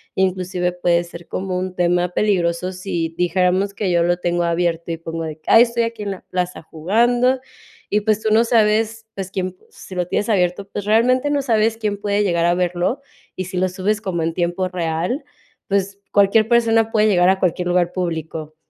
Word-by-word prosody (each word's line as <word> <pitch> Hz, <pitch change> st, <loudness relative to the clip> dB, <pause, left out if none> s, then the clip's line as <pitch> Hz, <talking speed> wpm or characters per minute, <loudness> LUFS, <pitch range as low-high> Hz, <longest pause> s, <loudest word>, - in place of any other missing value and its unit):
Inclusive 185 Hz, -1 st, 0 dB
puede 175 Hz, -1 st, +1 dB
ser 170 Hz, 0 st, -11 dB
como 185 Hz, -1 st, -3 dB
un 185 Hz, 0 st, -4 dB
tema 175 Hz, 0 st, +2 dB
peligroso 180 Hz, -2 st, 0 dB
si 180 Hz, -3 st, -3 dB
dijéramos 185 Hz, +2 st, +1 dB
que 200 Hz, -2 st, -2 dB
yo 170 Hz, -1 st, +3 dB
lo 175 Hz, +1 st, +1 dB
tengo 175 Hz, 0 st, 0 dB
abierto, 170 Hz, 0 st, -1 dB
y 165 Hz, -, -3 dB
pongo 165 Hz, 0 st, -5 dB
de 155 Hz, -1 st, -5 dB
que: 155 Hz, -, -4 dB
"Ay, 225 Hz, -, +9 dB
estoy 235 Hz, -1 st, 0 dB
aquí 230 Hz, -2 st, -4 dB
en 200 Hz, -, -3 dB
la 190 Hz, -, -7 dB
plaza 180 Hz, 0 st, -2 dB
jugando", 240 Hz, +11 st, +1 dB, 0.5 s
y 210 Hz, -, +1 dB
pues, 215 Hz, 0 st, +1 dB
tú 220 Hz, -, 0 dB
no 225 Hz, +2 st, +5 dB
sabes, 225 Hz, 0 st, +2 dB
pues, 195 Hz, -1 st, -5 dB
quién, 185 Hz, -1 st, -3 dB
si -, -, -12 dB
lo 180 Hz, -1 st, -1 dB
tienes 205 Hz, +4 st, -1 dB
abierto, 190 Hz, -1 st, +1 dB
pues, 205 Hz, 0 st, -5 dB
realmente 250 Hz, +6 st, +3 dB
no 290 Hz, -1 st, +1 dB
sabes 225 Hz, -3 st, +2 dB
quién 210 Hz, -2 st, -2 dB
puede 205 Hz, 0 st, 0 dB
llegar 170 Hz, -4 st, +1 dB
a 175 Hz, -, +3 dB
verlo. 180 Hz, +8 st, -1 dB, 0.3 s
Y 185 Hz, -, -4 dB
si 185 Hz, +1 st, -6 dB
lo 185 Hz, +1 st, +1 dB
subes 195 Hz, +3 st, -1 dB
como 180 Hz, -6 st, -2 dB
en 165 Hz, 0 st, -1 dB
tiempo 175 Hz, +2 st, -1 dB
real, 175 Hz, -, -2 dB, 0.4 s
pues, 200 Hz, 0 st, -1 dB
cualquier 205 Hz, +2 st, +4 dB
persona 225 Hz, -1 st, +3 dB
puede 215 Hz, -1 st, +3 dB
llegar 180 Hz, -3 st, +4 dB
a 190 Hz, 0 st, +2 dB
cualquier 180 Hz, -1 st, 0 dB
lugar 175 Hz, -1 st, +2 dB
público. 160 Hz, -3 st, -4 dB
185 Hz, 200 wpm, -20 LUFS, 175-215 Hz, 0.5 s, Ay